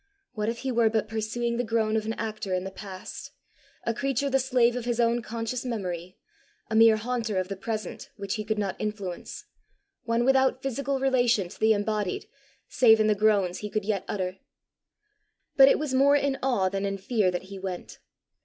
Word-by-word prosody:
What 215 -2 -1
if 230 - -3
he 265 0 -2
were 230 -2 +3
but 220 -1 0
pursuing 225 +2 -2
the 245 - 0
groan 220 -1 0
of 215 -1 -1
an 225 - -1
actor 215 -4 -3
in 180 - -2
the 190 - -6
past 190 -1 -8 0.5
a 230 - 0
creature 275 +2 -1
the 270 - +3
slave 250 -2 +2
of 245 -2 -4
his 240 -1 -1
own 235 0 +2
conscious 230 +2 -4
memory 185 -7 -4 0.5
a - - 0
mere 225 0 +7
haunter 225 -2 -2
of 185 0 -1
the 195 - -3
present 215 +2 -5
which 200 -1 -3
he 215 -2 -3
could 215 0 -2
not 200 -2 -1
influence 205 -4 -5 0.6
one 230 +1 +1
without 265 0 +3
physical 270 +1 -1
relation 245 -8 +2
to - - -13
the 220 0 +5
embodied, 205 -2 -2 0.4
save 225 -3 +5
in 215 - +3
the 215 - +4
groans 200 -4 +2
he 210 - -5
could 215 -1 -2
yet 200 -3 -1
utter! 185 -2 -3 1.2
But 270 -1 +8
it - - +5
was 295 -3 -3
more 275 +2 +5
in 280 -1 +1
awe 240 -8 +2
than 195 +1 -2
in 195 0 -1
fear 200 0 +1
that 180 0 -3
he 195 - -7
went. 185 -2 -6
220 Hz, 200 wpm, -27 LUFS, 200-245 Hz, 1.2 s, But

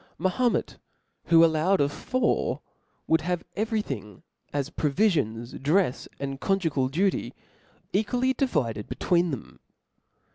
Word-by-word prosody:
Mahomet, 220 +8 0 0.5
who 165 0 +7
allowed 165 +4 +2
of 140 0 +2
four,' 255 - 0 0.5
woul(l 160 0 +3
have 175 +1 -2
every 215 0 0
thing, 105 - -7 0.3
as 145 +1 -2
provifions, 140 - 0
drefs, 155 0 +1
and 135 -1 -4
conju 195 -5 +1
gal 130 -2 +1
duty, 180 +8 0 0.6
equally 245 +6 +1
divided 125 - -1
bcitween 175 0 +1
them. 135 -7 -7
165 Hz, 115 wpm, -26 LUFS, 140-200 Hz, 0.6 s, who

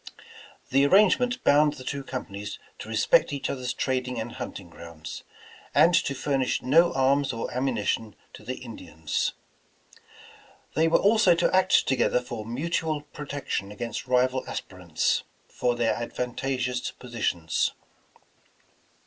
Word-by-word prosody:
The 135 +1 +4
ar - - +2
rangement 240 - +4
bound 150 +1 +5
the 130 - -10
two 140 +1 -4
companies 105 -6 -6 0.2
to - - -8
respect - - +3
each 140 -2 -2
other's 125 -2 -3
trading 125 -2 -2
and 115 +2 -4
hunting - - -7
grounds, 85 -2 -9 0.5
and 175 - +6
to 140 - +2
furnish 135 -1 0
no 165 +6 +5
arms 135 +1 +2
or 115 -2 -4
ammunition 115 -4 -1 0.2
to - - -12
the 130 +4 -4
Indians. 80 -10 -3 1.4
They 160 +2 +3
were 165 - +5
also 205 -4 +5
to 170 +2 +2
act 185 0 +4
together 130 -1 +2
for 120 -3 -7
mutual 155 +4 -1
protection 145 -8 -5
against 115 +4 -5
rival 130 +1 +2
as - - -2
pirants 90 -4 -1 0.3
for 125 -1 -1
their 120 -1 +1
advantageous 125 +1 -2
positions. 110 -9 -1
130 Hz, 130 wpm, -26 LUFS, 115-145 Hz, 1.4 s, and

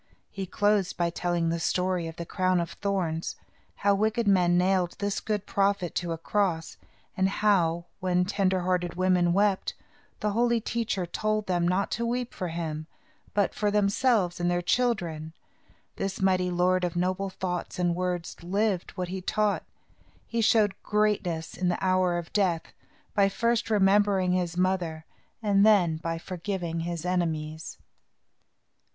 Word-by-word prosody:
He 195 -1 -5
closed 205 0 +1
by 170 -1 +1
telling 170 -1 0
the 165 0 -1
story 180 0 0
of 165 - -7
the 170 - -6
crown 185 0 +1
of 170 -1 -3
thorns, 180 -5 -2 0.4
how 200 0 +2
wicked 220 +2 +1
men 180 -3 +4
nailed 180 -1 +2
this 200 -1 -1
good 210 -2 -2
prophet 195 -3 0
to 175 -2 -2
a 165 - -2
cross, 170 -1 -1 0.4
and 190 0 +2
how, 175 -5 +2
when 180 -1 +1
tender 190 -1 +1
hearted 180 -1 -1
women 180 -1 +3
wept, 200 +1 +1 0.4
the 210 - 0
Holy 235 +2 +2
Teacher 225 -5 -2
told 215 +4 -1
them 175 -2 +1
not 185 +3 0
to 235 - -1
weep 245 0 -2
for 185 - -4
him, 160 -2 -4 0.5
but 205 -2 +2
for 210 - 0
themselves 205 -2 +2
and 175 0 +1
their 175 0 0
children. 170 -9 0 0.6
This 195 0 -3
mighty 185 -1 +2
lord 180 +1 +2
of 175 -1 -1
noble 185 +2 0
thoughts 180 -2 -4
and 175 -1 +1
words 180 -1 -2
lived 195 +1 -1
what 180 -1 -2
he 190 0 -4
taught. 210 +2 0 0.6
He 230 0 -1
showed 215 -2 +4
greatness 205 -6 0
in 180 - -1
the 175 - 0
hour 185 -2 +2
of 170 -1 -6
death, 180 -6 0 0.4
by 200 -1 +4
first 230 +3 0
remembering 200 -2 +3
his 180 -1 -1
mother, 180 -4 0 0.4
and 200 -1 +4
then 190 -7 +4
by 165 0 -3
forgiving 175 -1 -4
his 170 0 -4
enemies. 160 -3 -2
185 Hz, 155 wpm, -27 LUFS, 175-200 Hz, 0.6 s, men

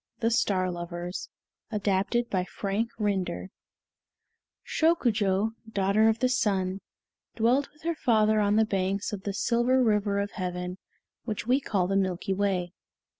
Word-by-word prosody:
THE 230 0 +1
STAR 185 -5 +1
LOVERS 175 +1 -5 0.4
ADAPTED 210 +3 0
BY 185 -2 0
FRANK 205 +4 -2
RINDER 190 -3 -2 1.1
Shokujo, 220 - +2 0.2
daughter 200 +2 +3
of 220 - +1
the 255 - +2
Sun, 195 -6 0 0.6
dwelt 245 +5 +2
with 300 +1 -24
her 335 +1 0
father 215 -7 +3
on 205 0 +2
the 220 0 +4
banks 195 0 -1
of 195 -2 -6
the 200 - -2
Silver 245 +4 +2
River 210 -3 +2
of 200 0 -1
Heaven, 180 0 -4 0.5
which 220 -1 -3
we 255 +3 +3
call 195 -8 0
the 195 +2 -1
Milky 190 -1 0
Way. 185 -3 -1
205 Hz, 140 wpm, -28 LUFS, 190-225 Hz, 1.1 s, the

